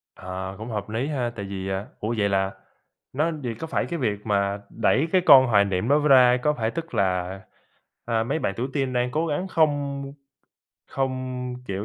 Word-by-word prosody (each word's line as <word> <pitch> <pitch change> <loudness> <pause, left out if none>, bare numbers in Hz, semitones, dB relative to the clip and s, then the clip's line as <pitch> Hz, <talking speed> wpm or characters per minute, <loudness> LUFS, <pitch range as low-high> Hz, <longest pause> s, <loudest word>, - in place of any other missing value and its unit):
Ờ, 95 +1 -6
cũng 110 +2 -7
hợp 105 -2 -4
lý 120 +6 -2
ha, 130 -6 -1
tại 100 - -5
vì, 95 -1 -5
à 95 +2 -3
ủa, 110 +2 -2
vậy 100 -1 +2
là 95 0 +1 0.6
nó 155 +5 +1
vậy 120 -2 -3
có 160 - -5
phải - - -1
cái 170 -2 -4
việc 105 -5 -2
mà 100 -1 0
đẩy 130 +6 +1
cái 185 -1 +4
con 130 -5 +8
hoài 100 -4 +4
niệm 95 +2 -1
đó 145 +1 +5
ra, 130 -4 +6
có 150 - +3
phải 115 -4 -2
tức 165 0 -6
là, 95 0 0 0.7
a, 115 -1 +1
mấy 140 +6 -1
bạn 130 -10 -2
tuổi 125 +3 -2
teen 135 -3 0
đang 125 0 0
cố 160 +3 0
gắng 165 +5 -2
không 145 -4 +1 0.9
không, 130 -1 -3
kiểu, 100 +1 -3
120 Hz, 205 wpm, -24 LUFS, 100-140 Hz, 0.9 s, con